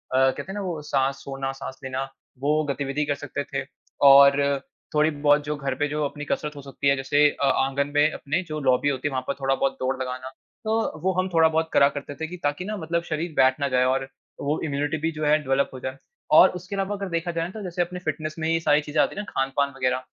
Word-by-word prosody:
कहते 130 0 +3
हैं - - -5
ना, 205 - -4
वो 175 -5 -3
साँस 135 -1 0
छोड़ना, 135 -1 -4
साँस 130 - -7
लेना, 130 0 -2 0.4
वो 150 +3 +2
गतिविधि 140 +1 -1
कर 145 -1 0
सकते 145 0 -5
थे 135 -1 -1 0.4
और 140 +1 +8 0.5
थोड़ी-बहुत 150 -1 +3
जो 150 +1 -2
घर 140 -2 -2
पे 145 - +2
जो 150 +1 -2
अपनी 145 +1 -5
कसरत 150 0 -2
हो 145 - -8
सकती 140 +1 -4
है, 140 - +5
जैसे 145 +2 +3
अ, 140 - -2
आँगन 135 +1 +1
में 150 +1 +4
अपने 155 +5 -2
जो 155 -3 -5
लॉबी 130 0 +2
होती 135 0 -1
है - - -3
,वहाँ 130 -1 -2
पर - - 0
थोड़ा 135 0 +2
बहुत 135 0 0
दौड़ 130 +1 0
लगाना। 130 0 -4 0.4
तो 220 -7 -1
वो 190 +3 +2
हम 185 - +1
थोड़ा 165 -1 +6
बहुत 160 0 0
करा 140 - +6
करते 145 0 -7
थे 160 +3 -4
कि 180 +2 -8
ताकि 145 +5 -1
ना, 215 +2 -3
मतलब 170 -1 -2
शरीर 160 0 -3
बैठ 130 0 +4
ना 140 - +1
जाए 125 0 +3
और 135 +1 0 0.3
वो 145 +2 0
इम्यूनिटी 145 +1 -1
भी 165 - +1
जो 155 -1 -4
है, 150 +1 +5
डेवलप 135 0 +1
हो 130 - -7
जाए 130 +1 -5 0.4
और - - +9
उसके 185 +3 -7
अलावा 195 +1 -1
अगर 200 -1 -5
देखा 170 0 -2
जाए 165 -1 -2
ना, - - -5
तो 215 - -8
जैसे 180 -1 -2
अपने 180 +1 -3
फ़िटनेस 155 -2 -4
में 160 - -1
ही 165 - +2
ये 165 - +2
सारी 150 -2 +3
चीज़ें 150 0 0
आती - - -3
हैं 210 - -3
ना, 205 - -9
खान-पान 135 +1 +1
वग़ैरह, 130 0 0
145 Hz, 255 wpm, -25 LUFS, 135-160 Hz, 0.5 s, और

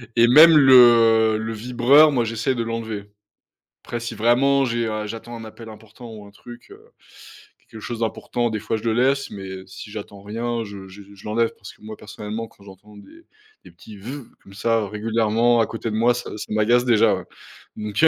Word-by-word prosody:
et 120 0 +5
même 155 +5 +8
le, 135 -2 +5 0.6
heu, - - -1
le 110 +1 -5
vibreur, 125 +7 +4
moi, 125 -4 0
j'essaye 115 +4 -2
de 120 - -3
l'enlever, 110 -3 -6 0.7
après 120 - -5
si, 115 -1 -6
vraiment, 135 +5 +2
j'ai, 115 -1 -2
heu, 110 -1 -4
j'attends 115 +2 -8
un 115 - -9
appel 110 +1 -12
important 110 +2 -13
ou 105 -2 -11
un 100 - -16
truc, 120 +3 -14
heu, - - -15 0.9
quelque 110 - -12
chose 115 +3 -6
d'important, 120 +1 -2
des 110 -1 -4
fois, 110 - -3
je 105 - -10
le 115 -1 0
laisse 135 +3 0
mais 95 -2 -8
si 95 +2 -11
j'attends 100 -2 -9
rien, 115 +2 -4
je 100 -2 -10
je 100 +2 -13
je 95 - -17
l'enlève 115 +2 -1
parce 95 - -12
que - - -27
moi, 110 0 -9
personnellement, 105 +2 -7
quand 100 - -23
j'entends 105 +2 -16
des 330 - -17 0.4
des - - -14
petits 105 -2 -14
«veuv» 130 +6 -8 0.2
comme 100 - -16
ça, 115 0 -1
régulièrement, 115 +2 0
à 110 - +2
côté 115 0 -5
de - - -4
moi, 120 +2 +3
ça 120 - -6
ça - - -6
m'agace 120 +3 +2
déjà, 115 -3 +3
ouais, - - -7 0.5
donc 105 +4 -4
heu, - - +9
115 Hz, 210 wpm, -21 LUFS, 105-120 Hz, 0.9 s, heu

